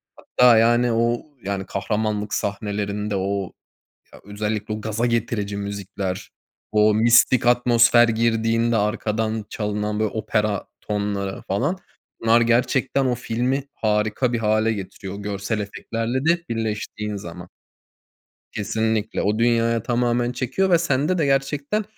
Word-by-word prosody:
Hatta, 125 Hz, -2 st, +4 dB
yani, 120 Hz, +1 st, +4 dB
o, 115 Hz, +1 st, +1 dB, 0.2 s
yani, 100 Hz, -1 st, -3 dB
kahramanlık 105 Hz, +1 st, -2 dB
sahnelerinde 105 Hz, 0 st, -2 dB
o 95 Hz, -1 st, -2 dB, 0.6 s
ya, -, -, -14 dB
özellikle 105 Hz, +1 st, -3 dB
o 105 Hz, -, -5 dB
gaza 110 Hz, +2 st, -1 dB
getirici 115 Hz, -3 st, -1 dB
müzikler, 100 Hz, -2 st, -5 dB, 0.4 s
o 105 Hz, 0 st, +4 dB
mistik 115 Hz, +2 st, +4 dB
atmosfer 120 Hz, -1 st, +5 dB
girdiğinde 115 Hz, 0 st, +1 dB
arkadan 110 Hz, 0 st, -1 dB
çalınan 105 Hz, 0 st, -2 dB
bir -, -, +2 dB
opera 105 Hz, -1 st, -1 dB
tonları 100 Hz, -2 st, -3 dB
falan. 140 Hz, -, -1 dB, 0.4 s
Bunlar 115 Hz, +1 st, +4 dB
gerçekten 125 Hz, +3 st, +2 dB
o 125 Hz, -, +1 dB
filmi 125 Hz, +3 st, -1 dB
harika 110 Hz, +3 st, 0 dB
bir 120 Hz, -, 0 dB
hâle 110 Hz, 0 st, +2 dB
getiriyor, 100 Hz, -1 st, -7 dB
o 100 Hz, -, -7 dB
görsel 100 Hz, +2 st, -3 dB
efektlerle 115 Hz, +5 st, -3 dB
de 170 Hz, +1 st, +2 dB
birleştiğin 105 Hz, -2 st, -3 dB
zaman. 90 Hz, -2 st, -9 dB, 1.0 s
Kesinlikle. 110 Hz, +1 st, -1 dB
O 105 Hz, +2 st, 0 dB
dünyaya 115 Hz, -1 st, +2 dB
tamamen 120 Hz, 0 st, 0 dB
çekiyor 130 Hz, +10 st, -1 dB
ve 170 Hz, -, +5 dB
sende 160 Hz, +2 st, 0 dB
de 155 Hz, -, +2 dB
gerçekten 140 Hz, +9 st, 0 dB
110 Hz, 125 wpm, -22 LUFS, 105-120 Hz, 1.0 s, atmosfer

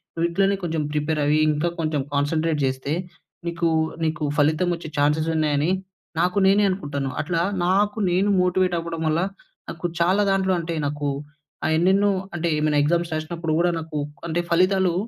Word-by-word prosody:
నువ్వు 170 Hz, 0 st, +1 dB
ఇట్లనే 195 Hz, +3 st, +2 dB
కొంచెం 165 Hz, -2 st, -1 dB
ప్రిపేర్ 150 Hz, +1 st, -1 dB
అయ్యి, 150 Hz, +1 st, +3 dB
ఇంకా 150 Hz, +3 st, 0 dB
కొంచెం 155 Hz, -3 st, 0 dB
కాన్సంట్రేట్ 155 Hz, +1 st, 0 dB
చేస్తే, 130 Hz, +2 st, -2 dB, 0.5 s
నీకు 170 Hz, 0 st, 0 dB, 0.4 s
నీకు 155 Hz, -1 st, -1 dB
ఫలితం 155 Hz, +4 st, +2 dB
వచ్చే 165 Hz, -1 st, -9 dB
చాన్సె‌స్ 150 Hz, +2 st, +2 dB
ఉన్నాయని, 155 Hz, +1 st, +1 dB, 0.5 s
నాకు 180 Hz, +3 st, +1 dB
నేనే 200 Hz, +2 st, +5 dB
అనుకుంటాను. 145 Hz, -7 st, -3 dB
అట్లా, 170 Hz, -2 st, -1 dB, 0.2 s
నాకు 205 Hz, +4 st, +2 dB
నేను 190 Hz, +3 st, +2 dB
మోటివేట్ 180 Hz, 0 st, +2 dB
అవ్వడం 165 Hz, -1 st, -5 dB
వల్ల, 155 Hz, +2 st, +1 dB, 0.5 s
నాకు 165 Hz, +1 st, -6 dB
చాలా 185 Hz, +4 st, +3 dB
దాంట్లో 190 Hz, -1 st, +2 dB
అంటే, 165 Hz, 0 st, -3 dB
నాకు 145 Hz, 0 st, -2 dB, 0.6 s
ఆహ్, 160 Hz, -, +2 dB
ఎన్నెన్నో 195 Hz, +4 st, +3 dB, 0.2 s
అంటే, 170 Hz, 0 st, -1 dB
ఏమైనా 150 Hz, -1 st, +2 dB
ఎగ్జామ్స్ 170 Hz, +2 st, +1 dB
రాసినప్పుడు 160 Hz, +1 st, -3 dB
గూడా 175 Hz, 0 st, +3 dB
నాకు 160 Hz, -2 st, -5 dB, 0.3 s
అంటే, 170 Hz, +1 st, 0 dB
ఫలితాలు 185 Hz, +1 st, +3 dB
165 Hz, 155 wpm, -23 LUFS, 155-180 Hz, 0.6 s, నేనే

